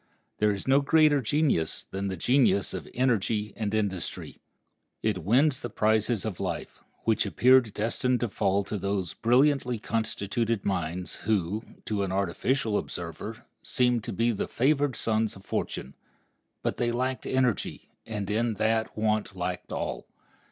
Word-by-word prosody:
There 105 - +4
is 100 +1 -3
no 135 +2 +5
greater 150 0 +4
genius 130 - +1
than 100 +1 -4
the 95 -1 -3
genius 120 -1 +3
of - - -6
energy 110 -4 +1
and 105 -3 -2
industry, 100 -5 -3 0.6
It 105 -4 +1
wins 130 - +3
the 120 - -5
prizes 110 0 +1
of 105 -5 -4
life, 90 -4 -4 0.2
which 110 -1 +2
appeared 125 +3 +4
destined 120 +3 0
to 120 - +1
fall 100 -1 +1
to 105 +1 -4
those 95 -3 -2
brilliantly 125 +1 +3
constituted 110 0 -1
minds, 90 -2 -2
who, 105 -1 0 0.2
to 105 -2 -1
an 95 -2 -1
artificial 105 +5 0
observer, 95 +8 -6 0.2
seemed 125 -3 +1
to - - -3
be 115 +1 +1
the 105 - -2
favored 140 +1 +1
sons 110 -1 0
of 95 0 -14
fortune. 65 - -3 0.7
But - - -1
they 120 -1 +1
lacked 130 +2 -2
energy, 130 -4 0
and 105 -3 -4
in 110 +2 0
that 110 +1 0
want 105 -2 0
lacked 90 0 -4
all. - - -3
110 Hz, 150 wpm, -28 LUFS, 100-125 Hz, 0.7 s, no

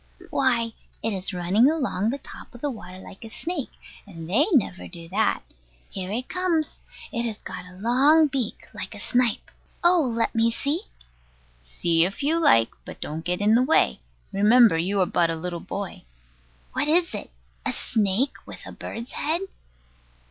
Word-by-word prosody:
Why, 235 -4 +2 0.3
it 225 0 0
is 190 -1 -2
running 190 +8 +3
along 255 - 0
the 270 - -1
top 275 - -12
of 240 - -12
the 290 - -1
water 185 -6 -9
like 190 +3 -12
a 225 - -8
snake; 325 +3 -4 0.4
and 165 -5 -9
they 235 - +3
never 235 - +1
do 170 -2 -8
that. 185 - +1 0.5
Here 190 -1 -4
it 245 +4 -2
comes. 355 -4 -1 0.3
It 235 - -1
has 220 -2 -4
got - - -8
a 180 0 -14
long 270 +9 +5
beak, 265 -6 -2
like - - -6
a - - -9
snipe. 245 -3 0 0.3
Oh, 350 0 +6
let 230 -5 0
me 230 0 +3
see. 285 +8 -1 0.8
See 165 - +1
if 195 +11 -2
you 320 +4 +2
like: 115 - +5
but - - -10
don't 155 +2 -5
get 180 +2 -1
in 210 +2 +4
the 235 - +5
way. 255 - +3 0.3
Remember 220 +1 +6
you 185 +5 0
are - - +4
but 170 -1 +2
a 165 - 0
little 170 +1 -4
boy. 195 +2 -5 0.7
What - - 0
is 335 +3 +3
it? - - -4 0.3
a - - 0
snake 220 +5 +1
with - - -9
a - - -8
bird's 235 +2 -7
head? 325 +4 -1
225 Hz, 175 wpm, -25 LUFS, 185-275 Hz, 0.8 s, Oh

